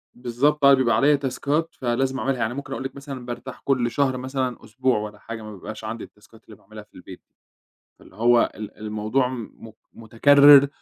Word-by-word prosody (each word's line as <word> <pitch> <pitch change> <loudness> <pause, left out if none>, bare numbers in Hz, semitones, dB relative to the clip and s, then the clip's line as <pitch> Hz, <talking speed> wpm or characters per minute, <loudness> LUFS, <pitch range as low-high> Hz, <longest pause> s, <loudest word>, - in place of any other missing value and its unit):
بالضبط، 125 +5 0
بقى 140 0 +7
بيبقى 120 -4 +2
عليّا 145 +5 +4
تاسكات 145 +4 -2
فلازم 130 +2 -1
أعملها، 130 +3 -1
يعني 115 +1 -1
ممكن 140 0 -6
أقول - - -5
لِك 135 - -6
مثلًا 135 -3 -8
بارتاح 125 +1 -8
كُلّ 125 -4 +1
شهر 135 -3 0
مثلًا 130 -1 -4
أسبوع 130 +3 0
والّا 105 0 -6
حاجة، 115 0 -8
ما 110 0 -9
بيبقاش 110 +3 -9
عندي 110 +1 -6
التاسكات 110 +2 -18
اللي 110 - -14
باعملها 105 +2 -13
في - - -33
البيت، 90 0 -12 0.8
فاللي - - -18
هو 120 +2 +3
ال 105 -1 -9
الموضوع 110 +4 -1
م 125 -4 -6
م 110 - -11 0.2
مُتكرر، 140 +5 +6
125 Hz, 190 wpm, -23 LUFS, 110-135 Hz, 0.8 s, بقى